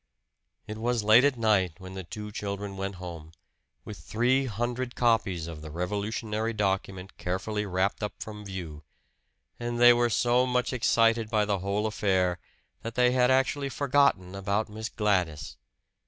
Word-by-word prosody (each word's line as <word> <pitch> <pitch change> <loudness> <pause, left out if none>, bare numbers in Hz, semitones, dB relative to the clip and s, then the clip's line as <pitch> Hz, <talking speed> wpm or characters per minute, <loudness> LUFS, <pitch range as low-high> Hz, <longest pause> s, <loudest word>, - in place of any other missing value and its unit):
It 110 +1 -7
was 120 -1 0
late 110 +4 +7
at 140 -3 +2
night 105 -7 +2
when 95 -1 -10
the 95 0 -6
two 105 +4 -7
children 100 -1 -5
went 95 0 -4
home, 85 -3 -9 0.5
with 105 - -8
three 130 +4 +1
hundred 120 +3 -3
copies 105 -8 +1
of 80 -2 -8
the 80 - -8
revolutionary 105 +6 -2
document 95 -2 -2
carefully 100 +4 -2
wrapped 95 +3 0
up 105 - -3
from 105 -1 -7
view; 90 -6 -7 0.8
and 120 0 -3
they 120 0 +8
were 120 0 +2
so 120 +3 +2
much 125 +1 0
excited 115 -2 +2
by 105 -2 +2
the 100 -2 0
whole 100 +3 -1
affair 95 -4 +1 0.4
that 115 0 -6
they 125 0 +4
had 125 0 +3
actually 135 +2 +1
forgotten 135 -10 +2
about 100 +2 -1
Miss 110 +2 -5
Gladys! 90 - -1
105 Hz, 155 wpm, -28 LUFS, 95-120 Hz, 0.8 s, they